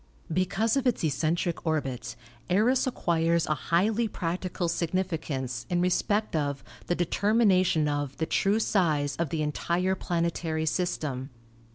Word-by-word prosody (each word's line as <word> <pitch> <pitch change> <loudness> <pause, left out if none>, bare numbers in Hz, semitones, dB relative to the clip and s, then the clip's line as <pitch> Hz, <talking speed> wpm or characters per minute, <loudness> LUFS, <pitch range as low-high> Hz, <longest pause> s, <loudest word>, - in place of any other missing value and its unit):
Because 195 - +1
of 270 -2 +1
its 240 - +1
eccentric 160 +3 0
orbit 145 -6 -2 0.3
Eros 235 +9 +3
acquires 170 -7 +1
a 155 - +1
highly 205 +9 +1
practical 180 -1 -3
significance 160 -8 -2
in 175 - +1
respect 205 +3 +1
of 145 -2 -1 0.2
the 175 - +1
determination 185 -3 +3
of 145 -2 -2
the 160 - 0
true 200 +5 +2
size 155 -10 +1
of 170 -3 -1
the 155 0 -1
entire 170 +5 0
planetary 170 -3 -1
system. 150 -6 -2
170 Hz, 130 wpm, -28 LUFS, 155-190 Hz, 0.3 s, Eros